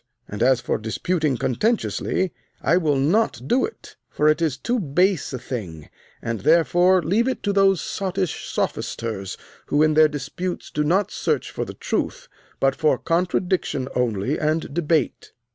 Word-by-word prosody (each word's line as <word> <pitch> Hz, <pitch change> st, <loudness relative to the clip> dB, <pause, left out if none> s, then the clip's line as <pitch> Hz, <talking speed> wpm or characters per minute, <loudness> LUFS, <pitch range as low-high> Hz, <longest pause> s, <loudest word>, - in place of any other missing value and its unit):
And, 105 Hz, -, -6 dB
as 125 Hz, 0 st, +4 dB
for -, -, -1 dB
disputing 145 Hz, -, -1 dB
contentiously, 190 Hz, -, 0 dB, 0.3 s
I 170 Hz, -, +2 dB
will 155 Hz, -5 st, +2 dB
not 155 Hz, -, +2 dB
do 255 Hz, -, +3 dB
it, 450 Hz, -, -11 dB
for 150 Hz, -, +1 dB
it 155 Hz, +2 st, +2 dB
is 155 Hz, -6 st, 0 dB
too 245 Hz, +1 st, -1 dB
base 180 Hz, +3 st, +1 dB
a 130 Hz, -, -3 dB
thing, 90 Hz, -, -7 dB, 0.3 s
and 115 Hz, -2 st, -2 dB
therefore 175 Hz, -, +4 dB
leave 205 Hz, -, +2 dB
it 260 Hz, -, -2 dB
to 205 Hz, -, 0 dB
those 195 Hz, -2 st, +4 dB
sottish 190 Hz, -3 st, -3 dB
sophisters 105 Hz, -4 st, -3 dB, 0.3 s
who 145 Hz, +1 st, +3 dB
in 155 Hz, 0 st, +3 dB
their 155 Hz, 0 st, +6 dB
disputes 150 Hz, +5 st, -5 dB
do 150 Hz, -, 0 dB
not 185 Hz, +6 st, +1 dB
search -, -, -1 dB
for -, -, -3 dB
the -, -, -9 dB
truth, -, -, -3 dB, 0.3 s
but 135 Hz, 0 st, +2 dB
for 155 Hz, -, +2 dB
contradiction 175 Hz, -5 st, 0 dB
only 120 Hz, +1 st, 0 dB
and 155 Hz, -1 st, -1 dB
debate. 160 Hz, -4 st, 0 dB
155 Hz, 160 wpm, -23 LUFS, 130-185 Hz, 0.3 s, their